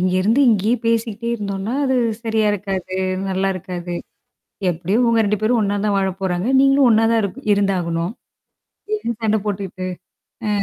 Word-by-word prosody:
இங்கிருந்து 185 +7 +2
இங்கேயே 215 +3 +2
பேசிக்கிட்டே 230 0 0
இருந்தோம்னா 200 +1 -3
அது 260 -1 +1 0.3
சரியா 220 -2 +1
இருக்காது. 190 -2 -3 0.3
நல்லா 190 0 0
இருக்காது. 175 -1 -5 0.8
எப்படியோ 175 +5 -1
உங்க 230 -1 +3
ரெண்டு 210 +1 +1
பேரும் 230 +2 +2
ஒண்ணாத்தான் 205 0 0
வாழப் 190 -1 -1
போறாங்க. 185 +1 -1
நீங்களும் 275 0 +5
ஒண்ணாத்தான் 225 0 +4
இரு 200 - 0 0.2
இருந்தாகணும். 180 -3 0 0.8
என்ன 420 - -2
சண்டை 220 0 +2
போட்டுக்கிட்டு? 195 -2 -4 0.6
அ - - 0
200 Hz, 135 wpm, -20 LUFS, 185-225 Hz, 0.8 s, நீங்களும்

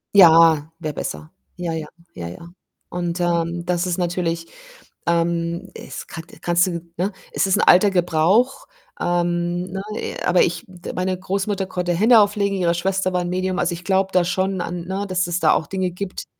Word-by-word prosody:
Ja. 165 -4 +7
Wäre 155 -3 -4
besser. 75 - -5 0.3
Ja, 175 -2 -3
ja, 160 -2 -4 0.3
ja, 85 -1 -6
ja. 130 - -10 0.4
Und, 175 0 -3
ähm, 170 0 0
das 175 0 0
ist 180 -2 -1
natürlich, 170 -2 -1 0.6
ähm 170 0 0
es - - -8
kan 165 - -8 0.2
kannst 175 +1 +3
du 170 -2 -3 0.2
ne, 190 +4 0 0.2
es - - +1
ist 190 - +3
'n - - +2
alter 195 +3 +6
Gebrauch, 185 - +2 0.3
ähm, 175 0 0
ne, 195 +1 -4 0.4
aber 180 - +4
ich 170 -1 0
d 180 -2 -9
meine 185 0 -1
Großmutter 195 +1 -2
konnte 180 -1 -1
Hände 225 +6 +6
auflegen, 205 -1 +2
ihre 175 -2 +2
Schwester 185 +2 0
war 180 - +1
'n 175 - -3
Medium. 185 0 -1
Also, 175 0 +1
ich 175 +1 -8
glaube 190 +1 +1
da 180 - +4
schon 185 +1 -1
an 175 0 -4
ne, 190 +2 -3
dass 185 -1 0
es 175 0 -1
da 155 - +4
auch 155 - 0
Dinge 185 0 -2
gibt, 185 +2 -6
175 Hz, 185 wpm, -21 LUFS, 170-190 Hz, 0.6 s, Ja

